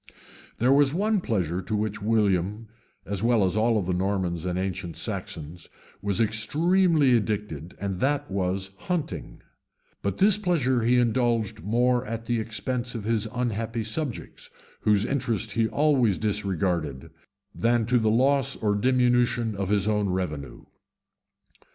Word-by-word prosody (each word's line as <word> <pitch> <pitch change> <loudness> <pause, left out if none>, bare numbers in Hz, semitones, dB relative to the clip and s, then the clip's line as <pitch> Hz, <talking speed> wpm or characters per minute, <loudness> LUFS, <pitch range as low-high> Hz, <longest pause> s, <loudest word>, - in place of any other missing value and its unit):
] - - -21
There 125 +3 +3
was 140 +1 +4
one 210 +1 +1
pleasure 90 - -1
to 105 +4 -3
which 105 0 -2
William, 105 -1 +1 0.4
as 100 -1 -3
well 115 -3 +3
as 95 - -1
all 110 0 +2
the 90 +1 -1
Normans 90 -2 -1
and 90 0 -1
ancient 95 -2 -4
Saxons, 80 +2 -5 0.3
was 100 0 0
extremely 150 - +3
addicted, 100 -7 -3
and 95 -2 -3
that 145 -2 0
was 95 0 -1 0.2
hunting; 175 -4 -3 0.6
but 100 - -2
this 205 +1 +4
pleasure 140 - +1
he 120 +2 +3
indulged 120 -4 +1
more 120 +6 +1
at 115 +1 -5
the 120 -1 0
expense 120 +3 -3
of 110 - -4
his 110 0 0
unhappy 115 -2 -2
subjects, 120 +4 -5 0.3
whose 105 0 +2
interests 115 -6 -1
he 115 -1 +2
always 130 -8 +2
disregarded, 90 -8 -2 0.4
than 115 0 +1
to 125 +2 +3
the 110 -1 +2
loss 135 +3 +2
or 105 -2 0
diminution 120 0 +2
of 100 -1 -3
his 100 0 +1
own 105 -2 +1
revenue. 75 -9 -4
110 Hz, 145 wpm, -26 LUFS, 95-125 Hz, 0.6 s, was